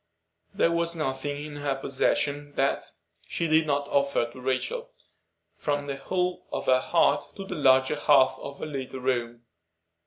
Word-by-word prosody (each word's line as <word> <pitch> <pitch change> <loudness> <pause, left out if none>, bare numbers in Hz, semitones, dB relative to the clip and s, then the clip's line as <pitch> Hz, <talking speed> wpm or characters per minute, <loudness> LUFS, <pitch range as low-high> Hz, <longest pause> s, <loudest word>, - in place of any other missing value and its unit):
There 170 - +2
was 170 0 0
nothing 145 -1 -3
in 150 -1 -8
her 145 -1 -1
possession 140 +2 -1
that 135 - +1 0.5
she 170 - -2
did 160 0 +3
not 145 -1 0
offer 140 -4 +1
Rachel, 130 - -2 0.6
from 145 -1 -2
the 140 -1 -4
whole 180 +5 -2
of - - -3
her 130 0 +5
heart 145 -3 +2
to 195 - -7
the 190 - -5
larger 130 -2 +4
half 140 -3 +5
of 140 0 -8
her - - -5
little 135 -3 -5
room. 120 -2 -1
145 Hz, 155 wpm, -27 LUFS, 130-155 Hz, 0.6 s, her